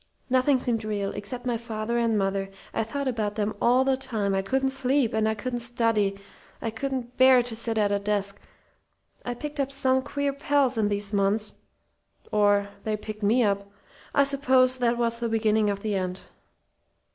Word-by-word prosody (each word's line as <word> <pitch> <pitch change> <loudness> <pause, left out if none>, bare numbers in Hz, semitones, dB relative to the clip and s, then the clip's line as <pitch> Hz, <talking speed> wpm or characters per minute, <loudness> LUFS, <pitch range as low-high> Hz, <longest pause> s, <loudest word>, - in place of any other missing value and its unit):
Nothing 260 +2 +4
seemed 235 -3 -1
real, 205 -2 -2
except 245 +5 -5
my 240 -2 0
father 230 0 -3
and 230 -2 +1
mother. 195 0 -1 0.2
I - - 0
thought 280 +5 -4
about 215 -5 -1
them 210 0 -1
all 250 +2 +4
the 265 0 +3
time. 220 -7 -2
I 195 - +1
couldn't 265 +6 0
sleep, 265 -2 +1
and 220 0 +2
I 220 - 0
couldn't 245 +3 -3
study. 230 -4 +1 0.4
I 225 - -3
couldn't 255 +1 -4
bear 260 -1 +6
to 235 -2 -5
sit 225 0 -1
at 205 -1 +2
a 200 - +1
desk. 200 -1 -2 0.8
I 245 - -3
picked 295 +3 -7
up 275 -1 0
some 260 -1 +1
queer 285 +1 -2
pals 280 -2 +1
in 220 -2 +1
those 205 0 -1
months 205 +2 +1 0.8
or 205 -1 +3 0.2
they 215 -1 -1
picked 215 0 -8
me 225 +5 +3
up. 200 -1 0 0.5
I 280 - +6
suppose 260 -2 +3
that 240 -1 +2
was 235 -1 0
the 235 -1 -1
beginning 220 -1 +2
of 200 -1 -2
the 215 0 -2
end. 185 -1 -2
230 Hz, 185 wpm, -26 LUFS, 205-255 Hz, 0.8 s, bear